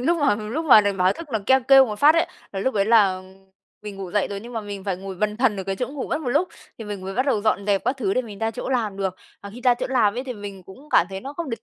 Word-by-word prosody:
Lúc 335 +7 +1
mà 285 -7 +3
lúc 220 +10 -4
mà 245 -8 +8
đến 200 -1 -1
báo 185 +1 +3
thức 335 - -9
nó 220 - +1
keo 265 0 +5
kêu 270 +1 +7
một 210 -1 -6
phát 300 +5 +6
ấy, 335 +1 +2 0.3
là 195 - -3
lúc 260 +4 -1
đấy 200 - +2
là 200 -4 +3 0.6
mình 210 -2 -8
ngủ 190 -2 -7
dậy 205 0 0
rồi 200 - -5
nhưng 235 +3 -10
mà 225 - -3
mình 200 -2 -8
phải 195 -3 -2
ngồi 190 +1 -7
bần 210 +3 -2
thần 235 -4 +2
ở 190 - -5
cái 195 0 -3
chỗ 250 - -3
ngủ 275 -1 -6
mất 300 - -1
một 280 - -4
lúc 300 +9 +1 0.3
thì 225 - -7
mình 205 -2 -6
mới 190 +1 -6
bắt 255 +4 0
đầu 225 -7 +1
dọn 205 -1 0
dẹp 200 -2 +1
các 265 - 0
thứ 205 -7 -1
để 255 - +1
mình 210 -4 -10
ra 225 +1 -1
chỗ 225 - -6
làm 225 -6 -1
được, 190 -2 -2 0.3
mà 200 - -8
khi 235 +4 -11
ra 245 -1 +5
chỗ 245 - -4
làm 235 -6 +2
ấy 250 +2 -4
thì 255 - -5
mình 205 -4 -9
cũng 260 +12 -15
cảm 175 - +4
thấy 190 0 -5
nó 275 +5 -7
không 315 -1 -5
được 230 -1 -5
215 Hz, 330 wpm, -23 LUFS, 195-260 Hz, 0.6 s, mà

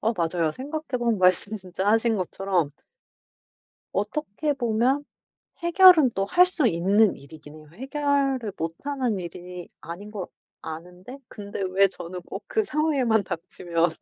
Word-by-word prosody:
어 225 - +1
맞아요. 170 -4 0
생각해 285 - -4
보면 235 -3 +1
말씀 185 +3 +2
진짜 190 -1 -5
하신 225 +1 +3
것처럼 185 -4 -1 1.2
어떻게 290 +7 -2
보면 250 +2 +1 0.6
해결은 345 -5 +7
또 195 - 0
할 355 - +6
수 340 -7 +4
있는 200 +4 +3
일이긴 150 +1 -13
해요. 155 -1 -15
해결을 270 -2 -1
못 165 0 -3
하는 260 -7 -1
일이 180 0 -8
아닌 190 +5 -8
걸 205 -4 -5 0.4
아는데 180 - -9
근데 205 -2 -7
왜 195 +1 +4
저는 180 -1 -8
꼭 - - -8
그 440 - +1
상황에만 275 - +1
닥치면 170 -1 -1
205 Hz, 275 characters per minute, -25 LUFS, 180-270 Hz, 1.2 s, 해결은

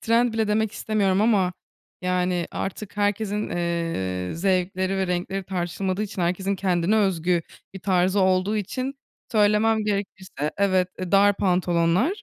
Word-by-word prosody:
trend 230 +1 +2
bile 220 -1 0
demek 215 0 +1
istemiyorum 200 -4 +1
ama, 200 -5 +3 0.5
yani, 180 -1 0
artık 200 +1 -5
herkesin, 205 0 0
eee, 165 - -2
zevkleri 185 +1 0
ve 190 -1 0
renkleri 180 +2 -2
tartışılmadığı 185 +2 -2
için 195 -3 -4
herkesin 190 +3 0
kendine 185 +2 +1
özgü 180 -4 +1 0.3
bir - - -6
tarzı 185 +1 +2
olduğu 190 +3 +2
için 255 +7 -3 0.4
söylemem 215 +1 +3
gerekirse 190 -7 -3
evet, 185 -2 +2
eee, 185 0 -5
dar 200 0 +5
pantolonlar, 180 - +1
190 Hz, 135 wpm, -24 LUFS, 180-210 Hz, 0.5 s, dar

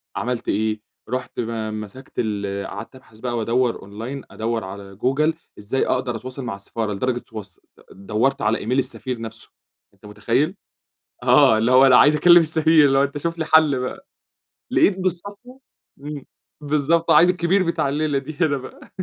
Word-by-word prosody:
عملت 120 +3 -3
إيه؟ 110 +1 -1 0.3
رُحت 130 0 -4
م 110 -2 -3
مسكت 130 +6 -11
ال 100 -3 -2
قعدت 115 +5 -8
أبحث 115 -4 -18
بقى 120 0 -3
وأدور 115 +2 0
online 115 +8 -7
أدور 115 0 -3
على 100 +1 -9
جوجل 140 +8 +1 0.3
إزاي 110 +6 -1
أقدر 125 -2 -1
أتواصل 130 +2 -7
مع 110 -4 -4
السفارة، 105 +2 -4
لدرجة 125 +5 -1
تص 105 -6 -11 0.3
دورت 110 +8 -1
على 110 +1 +1
email 125 +3 0
السفير 130 -2 -3
نفسه، 110 0 -9 0.4
أنت 100 +2 -20
متخيّل؟ 120 - -1 0.7
آه، 110 - +5
اللي 115 +3 +1
هو 130 +1 +7
أنا 130 -2 +6
عايز 150 +3 +6
أكلم 175 +2 +7
السفير 160 -1 +4
اللي 135 -1 +3
هو 135 - +4
أنت 140 +1 -3
شُف 165 +3 -3
لي 160 - -2
حل 155 -5 +4
بقى. 125 - -6 0.6
لقيت 190 -1 +3
بالصدفة 200 +8 -5 0.4
إمم، 145 -1 -7 0.4
بالضبط. 150 +3 +1
عايز 165 +4 +6
الكبير 180 +2 +2
بتاع 170 -5 0
الليلة 145 0 0
دي 145 +3 -6
هنا 145 -4 +2
بقى. 130 - -12
130 Hz, 165 wpm, -21 LUFS, 110-150 Hz, 0.7 s, هو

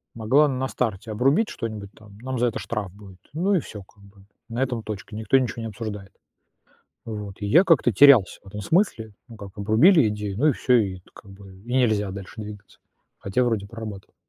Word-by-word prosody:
могла 130 +7 +3
на 130 -1 -2
старте 110 -2 -3
обрубить 135 - +2
что-нибудь 105 -3 -6
там: 105 -2 -17
"Нам 130 0 -4
за 125 - +2
это 115 - -3
штраф 105 -6 -5
будет". 95 -3 -15
Ну 185 +6 0
и - - +3
всё 105 -8 -9
как 100 +1 -24
бы, 100 0 -19 0.2
на 115 +2 -3
этом 125 -3 -3
точка, 105 +1 -7
никто 110 +4 +2
ничё 125 -2 -2
не 115 - -4
обсуждает. 105 -2 -7 0.9
Вот. 105 -3 -6
И - - -2
я 165 - +6
как-то 165 -9 +3
терялся 130 -3 +6
в - - -18
этом 105 +2 -7
смысле, 115 - 0 0.2
ну 115 - -12
как, 100 -2 -10
обрубили 115 - +5
идею, 105 -2 -5
ну 145 +7 +3
и - - +5
всё, 125 -1 +1
и 95 -4 -1
т - - -25
как 100 - -15
бы, 95 -1 -14
и 120 - -5
нельзя 110 -6 +1
дальше 100 +3 -8
двигаться, 105 -1 -11 0.4
хотя 100 +6 0
вроде 115 -5 -1
прорабатывал. 110 -3 -9
110 Hz, 205 wpm, -24 LUFS, 100-125 Hz, 0.9 s, я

